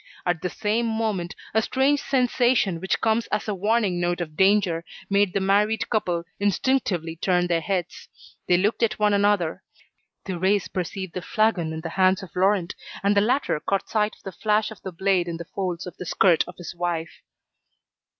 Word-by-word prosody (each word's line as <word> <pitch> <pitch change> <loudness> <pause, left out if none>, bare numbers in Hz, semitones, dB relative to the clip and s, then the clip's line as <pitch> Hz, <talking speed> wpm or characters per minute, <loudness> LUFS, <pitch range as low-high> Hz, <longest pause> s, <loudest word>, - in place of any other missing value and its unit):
At 175 -2 0
the 180 - -2
same 220 +4 -1
moment, 220 -5 -2 0.2
a 220 - +3
strange 270 +5 +1
sensation 245 -8 +2
which 190 - -1
comes 225 +1 +1
as 210 - -2
a 210 - 0
warning 205 -1 +1
note 175 0 0
of 155 -3 -5
danger, 190 -3 +3 0.3
made 200 -1 +3
the - - +1
married 205 +3 +2
couple 180 -7 0 0.2
instinctively 200 -5 0
turn 180 +1 +1
their 170 -2 +1
heads. 180 0 -3 0.4
They 175 - +4
looked 205 +6 0
at 225 -2 +1
one 210 -1 +3
another. 200 -5 +2 0.6
Thérèse 190 +2 0
perceived 185 0 -4
the 185 - -4
flagon 185 -4 +1
in 160 0 -5
the 165 - -5
hands 185 +2 +2
of 180 - -12
Laurent, 185 -1 +2 0.3
and 200 +1 +3
the 200 - +5
latter 240 - +1
caught 195 +5 -2
sight 215 -1 0
of - - -26
the 195 - -6
flash 210 +4 0
of 220 - -11
the 190 - -6
blade 185 0 +1
in 170 -1 -4
the 170 - -7
folds 180 -1 -4
of 180 - -8
the 180 - -6
skirt 175 -1 +4
of 180 - -10
his 175 -2 -7
wife. 170 -2 -3
190 Hz, 190 wpm, -24 LUFS, 175-210 Hz, 0.6 s, the